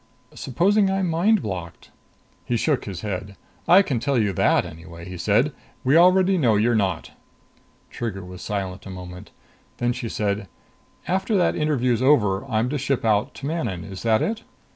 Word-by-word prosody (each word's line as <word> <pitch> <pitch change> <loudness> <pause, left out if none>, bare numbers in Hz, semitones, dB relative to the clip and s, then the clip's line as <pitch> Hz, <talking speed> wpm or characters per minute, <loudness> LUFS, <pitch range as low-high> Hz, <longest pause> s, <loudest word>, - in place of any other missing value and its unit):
"Supposing 195 - +1
I'm 190 -1 0
mind 180 +6 +2
blocked." 90 -5 -7 0.5
He 120 - -1
shook 145 +2 0
his 95 -4 -6
head. 100 -1 -5 0.3
"I 185 +3 +7
can 135 -10 -1
tell 140 +2 0
you 105 -4 +1
that, - - +2
anyway," 85 +1 -10
he 90 - -7
said. 110 - +2 0.3
"We 135 +3 +3
already 185 +2 +5
know 120 -7 +3
you're 115 +4 +2
not." 95 -6 -1 0.8
Trigger 95 -6 -5
was 90 0 -10
silent 100 -2 -4
a - - -8
moment. 90 -1 -9 0.5
Then 120 0 0
she 120 -2 -5
said, 100 -2 -2 0.6
"After 195 +3 0
that 180 - +2
interview's 125 -6 +1
over, 105 -9 +3
I'm 115 -3 0
to 145 +1 -2
ship 135 -3 -1
out 105 -1 +1
to 140 - -8
Manon 120 - -3
is 95 +1 -8
that 110 -1 +2
it?" 220 0 -2
115 Hz, 170 wpm, -23 LUFS, 95-150 Hz, 0.8 s, I